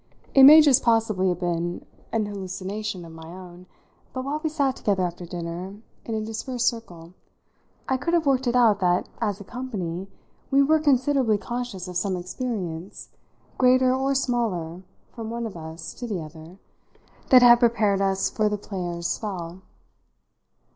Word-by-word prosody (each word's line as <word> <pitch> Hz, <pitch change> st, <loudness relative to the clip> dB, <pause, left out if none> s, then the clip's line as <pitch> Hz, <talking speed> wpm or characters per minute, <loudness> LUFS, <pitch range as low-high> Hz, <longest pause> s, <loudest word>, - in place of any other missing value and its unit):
It 270 Hz, -1 st, +8 dB
may 305 Hz, +3 st, +10 dB
just 285 Hz, -4 st, +5 dB
possibly 220 Hz, -5 st, +2 dB
have 180 Hz, 0 st, -3 dB
been 175 Hz, 0 st, -2 dB, 0.3 s
an 225 Hz, -2 st, 0 dB
hallucination 195 Hz, -1 st, -5 dB
of 165 Hz, -, -11 dB
my 160 Hz, 0 st, -11 dB
own, 180 Hz, +1 st, -12 dB, 0.5 s
but 255 Hz, 0 st, -4 dB
while 295 Hz, +2 st, -3 dB
we 315 Hz, -, 0 dB
sat 280 Hz, -4 st, 0 dB
together 195 Hz, -3 st, 0 dB
after 175 Hz, 0 st, -6 dB
dinner 175 Hz, +3 st, -6 dB, 0.3 s
in 225 Hz, -, -3 dB
a 215 Hz, -1 st, -3 dB
dispersed 240 Hz, +2 st, -3 dB
circle 175 Hz, -8 st, -4 dB, 0.7 s
I 265 Hz, -, +1 dB
could 335 Hz, +6 st, 0 dB
have 330 Hz, -2 st, +1 dB
worked 265 Hz, -2 st, +1 dB
it 240 Hz, -, +1 dB
out 225 Hz, -5 st, +4 dB
that, 180 Hz, -1 st, +1 dB
as 205 Hz, -1 st, -1 dB
a -, -, -8 dB
company, 195 Hz, -7 st, -5 dB, 0.4 s
we 275 Hz, +1 st, +4 dB
were 310 Hz, +3 st, +3 dB
considerably 265 Hz, -5 st, +2 dB
conscious 235 Hz, -4 st, -5 dB
of 180 Hz, -1 st, -4 dB
some 185 Hz, +1 st, -1 dB
experience, 180 Hz, -2 st, -5 dB, 0.5 s
greater 255 Hz, 0 st, +4 dB
or 270 Hz, +1 st, 0 dB
smaller 215 Hz, -10 st, -1 dB, 0.3 s
from 225 Hz, -2 st, -6 dB
one 235 Hz, 0 st, -4 dB
of 220 Hz, -, -7 dB
us 160 Hz, 0 st, -8 dB
to 245 Hz, -, -7 dB
the 205 Hz, -5 st, -3 dB
other, 160 Hz, +3 st, -11 dB, 0.7 s
that 255 Hz, -1 st, +8 dB
had 240 Hz, -1 st, +8 dB
prepared 220 Hz, -5 st, +2 dB
us 195 Hz, 0 st, +1 dB
for 215 Hz, -1 st, 0 dB
the 210 Hz, -, -2 dB
player's 175 Hz, -4 st, -5 dB
spell. 180 Hz, -3 st, -5 dB
210 Hz, 165 wpm, -24 LUFS, 180-250 Hz, 0.7 s, may